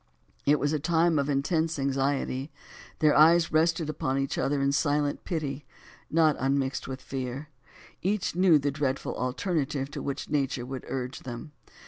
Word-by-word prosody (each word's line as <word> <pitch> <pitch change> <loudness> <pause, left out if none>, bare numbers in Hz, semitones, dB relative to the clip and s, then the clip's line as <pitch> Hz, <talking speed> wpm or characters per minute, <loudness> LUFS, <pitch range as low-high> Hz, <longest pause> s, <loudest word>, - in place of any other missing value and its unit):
It 150 +1 +5
was 145 +1 0
a 155 - +1
time 165 +1 +2
of 140 +1 -1
intense 160 +3 0
anxiety, 135 0 -1 0.5
their 155 -3 +4
eyes 165 +2 +6
rested 165 0 +2
upon 135 -3 -1
each 135 0 -1
other 145 +1 0
in 140 0 +2
silent 145 0 0
pity, 145 -4 -3 0.5
not 155 -2 +4
unmixed 135 0 0
with 130 -1 -5
fear. 135 +2 -5 0.5
Each 195 -2 -1
knew 180 -3 +6
the 145 0 0
dreadful 140 -1 -2
alternative 140 +1 -2
to - - -5
which 140 - -4
nature 135 -4 -1
would 130 0 -6
urge 130 0 -4
them. 125 +4 -8
145 Hz, 155 wpm, -28 LUFS, 135-155 Hz, 0.5 s, eyes